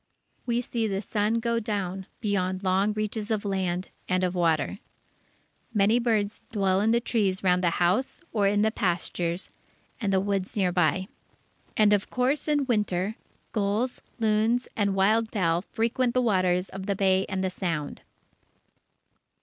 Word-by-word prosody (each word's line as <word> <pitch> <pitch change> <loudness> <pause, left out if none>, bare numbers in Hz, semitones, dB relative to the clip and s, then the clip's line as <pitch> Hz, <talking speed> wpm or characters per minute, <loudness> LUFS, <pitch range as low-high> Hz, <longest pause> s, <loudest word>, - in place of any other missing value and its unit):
We 240 0 +1
see 230 -2 -2
the 195 -2 -1
sun 210 +1 0
go 230 0 0
down 195 -4 -3
beyond 190 -3 -1
long 190 +2 +2
reaches 215 0 -3
of 215 -2 -1
land 185 -2 -1 0.2
and 185 0 +1
of 180 -1 +1
water. 170 +1 +1 1.0
Many 210 +4 +4
birds 220 -3 0
dwell 195 -3 +2
in 215 - +2
the 235 +1 +4
trees 205 -6 0
round 180 -1 +3
the 175 - +4
house 185 +9 +1
or 205 -3 +2
in 205 +1 +2
the 220 - +2
pastures 175 -2 -2 0.5
and 205 -5 0
the 190 - +3
woods 195 0 -2
near 185 -3 +2
by. 180 +1 +1 0.7
And, 210 -1 +5
of 200 -1 +1
course, 265 +4 0
in 295 -2 +2
Winter 210 -4 0 0.4
gulls, 215 +4 -1 0.2
loons, 225 +2 +2
and 200 -2 +1
wild 215 +4 +3
fowl 170 -5 +1
frequent 235 +4 -1
the 255 - +4
waters 185 -4 +2
of 195 0 -7
the 200 - +1
Bay 190 -1 +2
and 190 0 -2
the 190 - 0
Sound. 165 -6 -3
200 Hz, 160 wpm, -27 LUFS, 185-220 Hz, 1.0 s, And